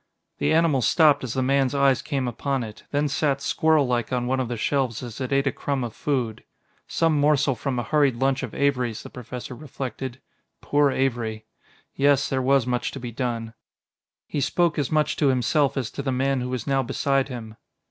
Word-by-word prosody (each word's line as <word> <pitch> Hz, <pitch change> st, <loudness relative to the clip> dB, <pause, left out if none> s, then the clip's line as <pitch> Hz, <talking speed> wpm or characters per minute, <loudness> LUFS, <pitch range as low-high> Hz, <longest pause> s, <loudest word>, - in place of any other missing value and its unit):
The -, -, +1 dB
animal 160 Hz, -4 st, +3 dB
stopped 150 Hz, +2 st, +4 dB
as 125 Hz, -1 st, -4 dB
the 130 Hz, -, +1 dB
man's 135 Hz, +1 st, +2 dB
eyes 140 Hz, -2 st, +3 dB
came 135 Hz, -4 st, -2 dB
upon 135 Hz, +2 st, -2 dB
it; 110 Hz, -2 st, -10 dB
then 145 Hz, +1 st, +1 dB
sat 140 Hz, 0 st, +1 dB
squirrellike 140 Hz, -5 st, +1 dB
on 125 Hz, -1 st, 0 dB
one 130 Hz, +1 st, 0 dB
of 130 Hz, -, -1 dB
the 120 Hz, 0 st, -4 dB
shelves 130 Hz, -1 st, -1 dB
as 120 Hz, 0 st, -7 dB
it 130 Hz, -, -3 dB
ate 135 Hz, 0 st, +2 dB
a 135 Hz, -, +2 dB
crumb 140 Hz, -1 st, -2 dB
of 115 Hz, -3 st, -5 dB
food. 125 Hz, -7 st, -2 dB, 0.4 s
Some 165 Hz, -3 st, +1 dB
morsel 145 Hz, -1 st, +3 dB
from 130 Hz, +1 st, -3 dB
a 120 Hz, -, -1 dB
hurried 145 Hz, -1 st, +2 dB
lunch 135 Hz, +2 st, +1 dB
of 130 Hz, -5 st, -6 dB
Avery's, 125 Hz, -5 st, 0 dB
the -, -, -10 dB
Professor 125 Hz, +1 st, -7 dB
reflected 130 Hz, -2 st, -6 dB, 0.4 s
poor 145 Hz, 0 st, +2 dB
Avery! 120 Hz, -5 st, -1 dB, 0.5 s
Yes, 140 Hz, 0 st, +3 dB
there 130 Hz, -1 st, 0 dB
was 135 Hz, -1 st, +3 dB
much 125 Hz, -1 st, -1 dB
to 135 Hz, -, -6 dB
be 120 Hz, -1 st, -6 dB
done. 115 Hz, -2 st, -3 dB, 0.7 s
He 145 Hz, -, -3 dB
spoke 170 Hz, +2 st, +1 dB
as 140 Hz, -, -1 dB
much 155 Hz, -1 st, +1 dB
to 145 Hz, -, +2 dB
himself 135 Hz, +3 st, +2 dB
as 125 Hz, -5 st, -2 dB
to -, -, -5 dB
the 135 Hz, -1 st, -1 dB
man 135 Hz, +1 st, 0 dB
who 125 Hz, -, -3 dB
was 125 Hz, -3 st, -3 dB
now 135 Hz, -1 st, +2 dB
beside 135 Hz, +2 st, 0 dB
him. 115 Hz, -4 st, -7 dB
135 Hz, 200 wpm, -24 LUFS, 125-140 Hz, 0.7 s, stopped